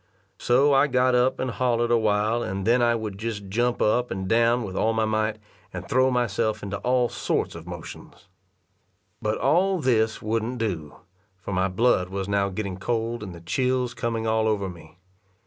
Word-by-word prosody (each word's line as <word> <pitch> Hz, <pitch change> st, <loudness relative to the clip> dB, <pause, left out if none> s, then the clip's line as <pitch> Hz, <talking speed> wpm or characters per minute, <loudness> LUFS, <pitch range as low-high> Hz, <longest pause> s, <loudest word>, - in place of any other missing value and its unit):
So 135 Hz, +4 st, +3 dB
I 135 Hz, +2 st, +5 dB
got 125 Hz, -1 st, +2 dB
up, 125 Hz, +1 st, +2 dB
and 130 Hz, -, -1 dB
hollered 120 Hz, -1 st, 0 dB
a 120 Hz, -, +5 dB
while, 110 Hz, +2 st, +1 dB
and 95 Hz, -2 st, -3 dB
then 120 Hz, +2 st, +3 dB
I 120 Hz, 0 st, +3 dB
would 105 Hz, -3 st, -5 dB
just 105 Hz, -3 st, -5 dB
jump 120 Hz, +4 st, 0 dB
up 125 Hz, +3 st, +2 dB
and 95 Hz, 0 st, -4 dB
down 115 Hz, +3 st, +3 dB
with 95 Hz, -3 st, -6 dB
all 110 Hz, +3 st, +1 dB
my 110 Hz, 0 st, +1 dB
might, 110 Hz, 0 st, 0 dB, 0.3 s
and -, -, -7 dB
throw 130 Hz, +1 st, +3 dB
myself 115 Hz, -3 st, 0 dB
into 100 Hz, +1 st, -3 dB
all 125 Hz, +1 st, +2 dB
sorts -, -, -2 dB
of 85 Hz, +1 st, -10 dB
motions. 90 Hz, +2 st, -10 dB, 0.9 s
But 105 Hz, 0 st, -1 dB
all 180 Hz, +9 st, +2 dB
this 115 Hz, -7 st, +1 dB
wouldn't 115 Hz, +3 st, -2 dB
do; 90 Hz, -10 st, -3 dB, 0.4 s
for 95 Hz, +1 st, -7 dB
my 95 Hz, +1 st, +1 dB
blood 95 Hz, -1 st, +2 dB
was 95 Hz, 0 st, -4 dB
now 100 Hz, -1 st, +1 dB
getting 95 Hz, -1 st, -4 dB
cold, 115 Hz, +3 st, -2 dB
and 95 Hz, -4 st, -7 dB
the 85 Hz, -, -12 dB
chills 125 Hz, +6 st, 0 dB
coming 115 Hz, -1 st, -2 dB
all 110 Hz, 0 st, +1 dB
over 105 Hz, -3 st, 0 dB
me. 85 Hz, -1 st, -12 dB
110 Hz, 185 wpm, -25 LUFS, 100-125 Hz, 0.9 s, I